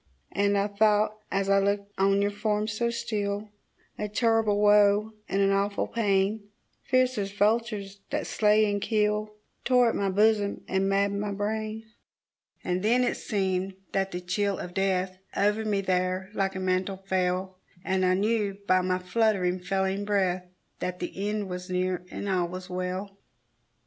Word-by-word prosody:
And 200 0 +2
I 200 - +2
thought 210 +1 +2 0.2
as 195 0 0
I 195 0 +4
looked 200 0 0
on 195 +1 +3
your 205 - +1
form 210 0 -1
so 225 +2 -1
still, 210 -2 -3 0.5
A 210 - -2
terrible 225 -1 +2
woe, 210 +1 +4 0.2
and 195 +1 +2
an 195 - +3
awful 200 +1 +1
pain, 205 -1 0 0.3
Fierce 255 -2 +2
as 195 -1 -2
vultures 205 -1 0
that - - -2
slay 215 0 +3
and 205 -1 -1
kill, 210 -1 0 0.3
Tore 250 -2 +4
at - - -2
my 200 -1 0
bosom 205 +1 +2
and 190 +1 +1
maddened 200 +1 +1
my 210 -1 -2
brain. 215 +2 -3 0.8
And 180 0 -1
then 240 +5 +3
it - - +1
seemed 190 -2 -2 0.2
that 195 0 0
the 180 -1 -5
chill 195 +2 -1
of 175 - -7
death 185 -1 0 0.2
Over 210 +2 +2
me 205 -2 +1
there 185 0 -1
like 195 -2 -1
a - - -3
mantle 185 +1 0
fell, 185 -1 -1 0.3
And 190 0 +1
I 185 0 +3
knew 205 0 0
by 185 0 +4
my 185 0 0
fluttering, 185 -1 +1
failing 190 +2 -1
breath 185 -3 0 0.3
That 180 0 -3
the - - -5 0.2
end 210 -1 -2
was 180 0 -6
near, 180 0 -1
and 200 - -5
all 185 -3 +1
was 185 +1 -8
well. 185 +2 -4
200 Hz, 165 wpm, -27 LUFS, 190-210 Hz, 0.8 s, I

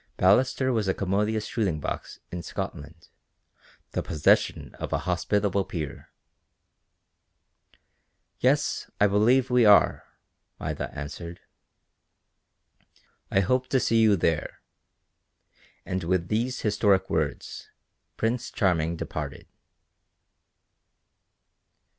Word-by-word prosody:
Ballaster 130 +7 +3
was 110 -4 0
a 95 - +1
commodious 105 +3 0
shooting 95 -9 -1
box - - -5
in 90 - -4
Scotland, 80 0 -7 0.8
the - - -1
possession 75 -4 +1
of - - -5
an - - 0
hospitable 100 -1 0
peer. 80 -6 -6 2.3
"Yes, - - +1
I 105 - +5
believe 115 +6 +3
we 125 -1 +5
are," 105 -2 +5 0.5
Maida - - -4
answered. 85 +3 -7 1.9
"I 95 - +3
hope 130 +6 +1
to 130 - +2
see 115 -2 +2
you 110 -2 +5
there," 80 -3 -1 1.2
and 90 -1 -3
with 85 0 0
these 120 +4 -1
historic 105 -2 +2
words, - - -3 0.5
Prince 115 +2 -1
Charming 85 -5 +1
departed. - - -6
100 Hz, 95 wpm, -26 LUFS, 85-115 Hz, 2.3 s, I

